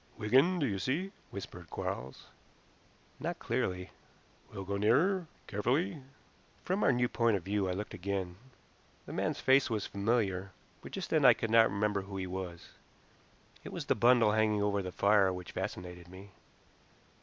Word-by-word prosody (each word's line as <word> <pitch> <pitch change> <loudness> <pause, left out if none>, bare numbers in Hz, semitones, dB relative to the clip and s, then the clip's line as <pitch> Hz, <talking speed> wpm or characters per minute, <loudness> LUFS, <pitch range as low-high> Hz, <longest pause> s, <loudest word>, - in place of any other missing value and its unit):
"Wigan, 135 +12 +3
do 150 - +1
you 100 -6 -1
see?" 155 - -1 0.2
whispered 90 -4 -8
Quarles. 65 +2 -5 0.9
"Not - - -3
clearly." 90 0 -2 0.6
"We'll 95 - -6
go 100 +1 -2
nearer. 160 - +2 0.2
Carefully." 140 - -1 0.6
From 190 +3 0
our - - +5
new 125 -1 +2
point 115 -3 +2
of 90 - -8
view 100 0 0
I - - 0
looked 105 +3 -5
again. 95 -1 -3 0.7
The - - -8
man's - - -1
face 130 0 +4
was 110 -3 -1
familiar, 100 -3 -1 0.3
but - - -10
just 190 -3 -5
then 155 -3 +3
I 125 -3 +8
could 115 - -3
not 115 0 +6
remember 100 0 0
who 95 0 -7
he 95 - -3
was. 90 -2 -6 0.9
It - - -8
was - - -5
the - - +3
bundle 120 -3 +5
hanging 105 -1 +2
over 100 -1 +1
the 90 -1 -5
fire 100 0 +4
which 90 -2 -7
fascinated 90 -1 -6
me. 95 +2 -12
105 Hz, 165 wpm, -32 LUFS, 95-125 Hz, 0.9 s, I